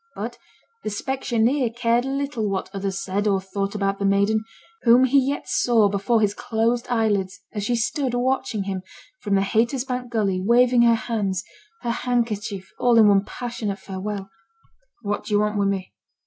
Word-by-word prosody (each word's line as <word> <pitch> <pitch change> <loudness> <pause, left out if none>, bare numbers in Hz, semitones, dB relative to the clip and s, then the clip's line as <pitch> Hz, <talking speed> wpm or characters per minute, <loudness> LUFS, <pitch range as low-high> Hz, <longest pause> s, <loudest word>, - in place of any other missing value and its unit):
But - - -5 0.4
the - - -2
specksioneer 240 +1 0
cared 240 +1 +2
little 275 -5 -2
what 195 -1 -3
others 195 -1 -3
said 200 +2 -1
or 195 -2 +2
thought 195 +1 -4
about 195 -1 -1
the 200 - -1
maiden, 200 +2 +2 0.4
whom 245 +1 +6
he 265 +2 +5
yet 285 - -3
saw 225 -4 +3
before 205 +3 +1
his 205 -1 +2
closed 235 +1 -1
eyelids 205 -5 0
as 205 -2 -3
she 240 - +1
stood 245 +2 -1
watching 245 -4 0
him, 190 -1 -3 0.4
from 205 -4 0
the 195 - +3
Haytersbank 245 +4 0
gully, 200 -5 0
waving 240 +3 +4
her 235 -1 +5
hands, 205 -5 -2 0.4
her 235 - 0
handkerchief, 230 -5 -2
all 240 -1 +4
in 215 -2 +7
one 200 -1 +4
passionate 230 -5 -4
farewell. 195 0 -6 0.7
'What 205 0 -2
do 210 - 0
yo' - - +4
want 210 0 0
wi' 200 - +2
me?' 195 -2 -2
220 Hz, 170 wpm, -23 LUFS, 200-240 Hz, 0.7 s, in